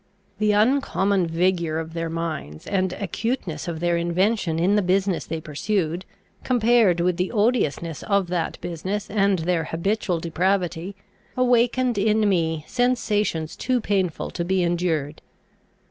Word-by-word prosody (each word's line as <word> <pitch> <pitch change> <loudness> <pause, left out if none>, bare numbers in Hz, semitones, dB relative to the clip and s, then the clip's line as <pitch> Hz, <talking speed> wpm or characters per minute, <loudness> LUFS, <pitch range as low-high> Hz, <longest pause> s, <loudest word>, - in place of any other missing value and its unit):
The 215 0 +3
uncommon 205 -5 +2
vigour 170 -1 0
of 160 0 -5
their 165 0 -3
minds, 160 - -5
and 185 -2 0
acuteness 195 - -3
of 165 -2 -4
their 175 0 +2
invention 175 +1 +1
in 180 +5 +3
the 210 - +3
business 190 0 0
they 160 0 -3
pursued, 170 +3 -2 0.4
compared 235 -7 +3
with 175 0 +1
the 180 +1 -1
odiousness 205 - 0
of 200 -2 +1
that 175 -2 -2
business 185 +5 -4
and 200 -2 +2
their 165 -1 0
habitual 180 +2 -1
depravity, 180 +2 -1 0.4
awakened 245 -1 +2
in 215 +1 +3
me 160 -5 0
sensations 215 -10 0
too 255 -1 0
painful 195 -6 -1
to 170 - -3
be 185 +1 +1
endured. 170 -4 -1
185 Hz, 135 wpm, -23 LUFS, 165-210 Hz, 0.4 s, The